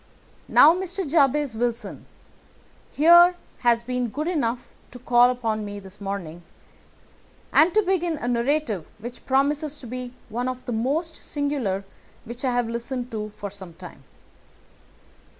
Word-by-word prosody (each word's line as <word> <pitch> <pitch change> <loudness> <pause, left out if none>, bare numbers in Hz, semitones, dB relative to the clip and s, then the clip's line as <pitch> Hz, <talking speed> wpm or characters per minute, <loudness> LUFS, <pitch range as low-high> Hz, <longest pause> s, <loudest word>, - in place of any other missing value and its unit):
Now, 315 - +7
Mr. 370 0 -4
Jabez 285 -3 +2
Wilson 235 0 -3 0.8
here 345 +4 +7 0.2
has 235 -1 +2
been 250 0 -2
good 300 +8 -3
enough 250 -8 -1 0.2
to 250 - -11
call 245 0 +4
upon 225 -4 -2
me 205 0 -6
this 195 +1 -13
morning, 190 -4 -5 1.1
and 325 +3 +6
to 430 - +5
begin 350 -4 0
a 245 - -5
narrative 240 - 0
which 240 +3 -9
promises 290 +2 +1
to 280 - -12
be 250 +1 -6
one 240 +3 -2
of 255 0 -5
the - - -4
most 295 +9 -1
singular 275 -10 -2 0.4
which 240 +3 -8
I 260 - +1
have 245 -1 0
listened 240 +2 -4
to 215 -1 -4
for 205 -1 -6
some 190 -4 -11
time. 175 -6 -12
245 Hz, 145 wpm, -24 LUFS, 225-295 Hz, 1.1 s, Now